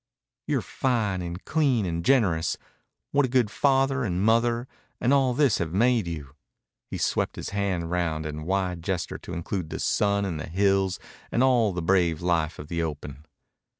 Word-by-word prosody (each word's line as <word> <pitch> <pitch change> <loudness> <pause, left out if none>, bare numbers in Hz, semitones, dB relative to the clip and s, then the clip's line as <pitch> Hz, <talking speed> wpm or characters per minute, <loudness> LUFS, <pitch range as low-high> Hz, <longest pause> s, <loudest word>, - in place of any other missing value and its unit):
"You're - - 0
fine 110 -8 -1
and 85 +1 -6
clean 140 -9 +2
and 85 -1 -2
generous 95 -12 +2 0.5
what 140 -1 +3
a - - -10
good 120 -4 +2
father 135 0 +2
and 95 -3 -1
mother, 115 +2 +2 0.3
and 125 +3 +2
all 135 -3 +3
this 140 -5 +3
have 80 -1 -2
made 115 -1 +3
you." 75 -5 -6 0.6
He - - -4
swept - - 0
his - - -5
hand 95 -4 -2
round 80 -3 -1
in 75 0 -4
a - - -7
wide 90 -1 -1
gesture 90 +1 -3
to - - -8
include 85 0 -3
the - - -4
sun 100 -1 +1
and 85 -5 -3
the 80 - -6
hills 95 +1 +2 0.3
and 120 - +2
all 120 -5 +4
the 90 -2 -4
brave 85 -3 +2
life 85 -3 0
of 75 - -8
the 85 +1 -2
open. 75 -2 -6
95 Hz, 185 wpm, -26 LUFS, 85-120 Hz, 0.6 s, all